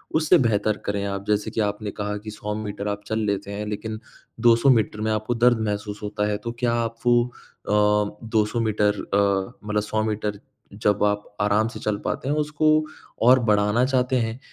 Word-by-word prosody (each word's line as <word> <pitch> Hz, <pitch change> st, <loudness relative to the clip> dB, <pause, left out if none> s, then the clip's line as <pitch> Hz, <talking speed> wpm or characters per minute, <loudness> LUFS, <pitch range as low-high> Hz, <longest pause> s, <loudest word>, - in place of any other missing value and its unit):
उससे 155 Hz, +3 st, +5 dB
बेहतर 110 Hz, -5 st, +1 dB
करें 100 Hz, -1 st, -1 dB
आप? 100 Hz, 0 st, -4 dB
जैसे 105 Hz, 0 st, 0 dB
कि -, -, -3 dB
आपने 105 Hz, 0 st, -2 dB
कहा 105 Hz, 0 st, -3 dB
कि 105 Hz, +1 st, -8 dB
100 105 Hz, 0 st, -5 dB
मीटर 105 Hz, -1 st, -5 dB
आप 100 Hz, 0 st, -3 dB
चल 110 Hz, -, -1 dB
लेते 100 Hz, -1 st, -2 dB
हैं, 105 Hz, +1 st, -4 dB
लेकिन 110 Hz, +1 st, -4 dB, 0.4 s
200 115 Hz, +3 st, +5 dB
मीटर 110 Hz, -4 st, +2 dB
में 110 Hz, 0 st, 0 dB
आपको 110 Hz, +3 st, -1 dB
दर्द 120 Hz, 0 st, +4 dB
महसूस 105 Hz, 0 st, -4 dB
होता 105 Hz, 0 st, -1 dB
है, 105 Hz, -, 0 dB
तो 115 Hz, +3 st, -5 dB
क्या 120 Hz, -2 st, +1 dB
आप 115 Hz, 0 st, -4 dB
वो 120 Hz, 0 st, +4 dB
अ, 125 Hz, -3 st, -11 dB, 0.6 s
200 110 Hz, +1 st, +1 dB
मीटर 105 Hz, -2 st, +1 dB
अ, 100 Hz, 0 st, +2 dB, 0.2 s
मतलब 105 Hz, 0 st, +1 dB
100 110 Hz, 0 st, -1 dB
मीटर 105 Hz, -1 st, -2 dB, 0.3 s
जब 105 Hz, 0 st, +1 dB
आप 105 Hz, 0 st, +1 dB, 0.2 s
आराम 105 Hz, +2 st, +2 dB
से 115 Hz, -, -8 dB
चल 105 Hz, -1 st, -1 dB
पाते 130 Hz, -, -2 dB
हैं 145 Hz, -, +1 dB
उसको 150 Hz, 0 st, 0 dB, 0.6 s
और 125 Hz, +2 st, +7 dB
बढ़ाना 105 Hz, +3 st, +3 dB
चाहते 130 Hz, -1 st, +1 dB
हैं 115 Hz, +1 st, -2 dB
105 Hz, 195 wpm, -24 LUFS, 105-115 Hz, 0.6 s, और